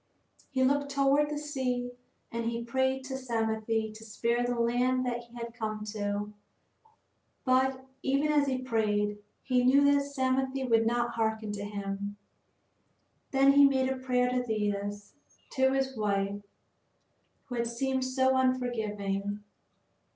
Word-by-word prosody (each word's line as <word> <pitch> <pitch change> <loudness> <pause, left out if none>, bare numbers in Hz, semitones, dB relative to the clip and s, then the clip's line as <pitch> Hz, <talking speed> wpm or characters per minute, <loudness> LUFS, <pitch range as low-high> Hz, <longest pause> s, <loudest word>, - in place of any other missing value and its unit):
He 260 -2 +1
looked 285 +2 +2
toward 280 +1 +3
the 300 - -3
sea 255 -4 -2 0.4
and 230 0 -3
he 235 0 -2
prayed 260 +2 0
to 265 0 -6
Psamathe 225 -3 -2 0.3
to 220 +1 -11
spare 235 +2 0
the 245 -1 -1
land 250 +2 +2
that 240 -1 -1
he 240 0 -18
had 235 -1 -6
come 215 -2 -4
to. 205 0 -3 1.1
But, 260 0 +2 0.2
even 275 +3 +1
as 290 -1 +3
he 260 -1 0
prayed, 210 -4 0 0.2
he 250 -2 +2
knew 270 +3 +5
that 285 - +3
Psamathe 265 -1 -1
would 225 0 +4
not 240 0 +1
harken 220 -1 -1
to 205 -1 -5
him. 200 0 -4 1.1
Then 270 0 +5
he 285 0 +8
made 265 -1 +3
a 265 - 0
prayer 250 -1 +1
to 250 0 0
Thetis, 205 -2 -2 0.4
to 265 -1 +3
his 265 0 0
wife 200 -2 -1 1.0
who 255 - -8
had 235 -1 0
seemed 260 +2 -1
so 260 0 +2
unforgiving. 210 -6 -1
245 Hz, 145 wpm, -30 LUFS, 220-265 Hz, 1.1 s, he